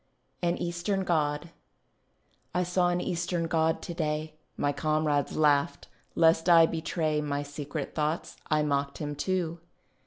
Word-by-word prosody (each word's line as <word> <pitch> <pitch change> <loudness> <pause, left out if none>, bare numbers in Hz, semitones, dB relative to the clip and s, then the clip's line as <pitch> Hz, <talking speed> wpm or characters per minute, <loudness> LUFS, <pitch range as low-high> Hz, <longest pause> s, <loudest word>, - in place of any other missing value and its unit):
AN 175 0 +1
EASTERN 175 +3 -1
GOD 155 -2 0 1.0
I 180 - +2
saw 180 0 +2
an 175 0 0
Eastern 175 -1 -1
God 160 0 +1
to 170 - -5
day; 155 -1 -2 0.2
My 145 - +1
comrades 155 -1 0
laughed; 150 0 +2 0.3
lest 165 +1 +4
I 165 -1 +8
betray 160 -2 -1
My 145 -1 -2
secret 145 0 -5
thoughts, 155 +2 -2
I 155 -1 +3
mocked 140 -1 -1
him 145 -1 -4
too. 170 +1 -2
160 Hz, 135 wpm, -28 LUFS, 150-170 Hz, 1.0 s, I